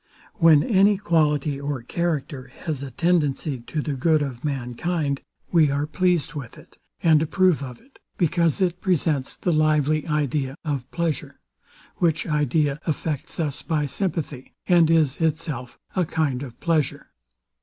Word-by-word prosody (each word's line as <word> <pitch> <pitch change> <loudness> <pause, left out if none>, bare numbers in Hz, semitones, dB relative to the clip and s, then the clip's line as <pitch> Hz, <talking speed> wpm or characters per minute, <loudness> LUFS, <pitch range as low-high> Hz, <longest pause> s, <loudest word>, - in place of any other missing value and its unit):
When 160 -4 +6
any 200 -1 +4
quality, 150 -6 +1
or 140 -3 -3
character, 140 -4 -3
has 150 -5 -3
a 140 - -5
tendency 150 -2 0
to 150 +5 -4
the 150 - -2
good 155 +3 +2
of 130 -3 -6
mankind, 140 +2 -2 0.3
we 160 -4 +5
are 140 +1 0
pleased 170 0 0
with 140 -6 -7
it, - - -17 0.2
and 160 -2 +5
approve 180 0 +2
of 125 -3 -7
it; 275 - -24 0.2
because 170 -1 +1
it 180 -1 0
presents 155 -7 0
the 175 - -1
lively 155 0 +2
idea 145 -3 -1
of 140 -4 -3
pleasure; 170 -5 -3 0.6
which 165 -2 +1
idea 150 -1 +1
affects 155 -2 -3
us 150 -4 -2
by 155 -3 -1
sympathy, 150 -4 -4
and 170 -3 +5
is 155 -5 +3
itself 155 -6 -2 0.2
a 185 - +2
kind 150 -6 -1
of 125 -5 -8
pleasure. 160 -5 -1
150 Hz, 145 wpm, -24 LUFS, 140-165 Hz, 0.6 s, When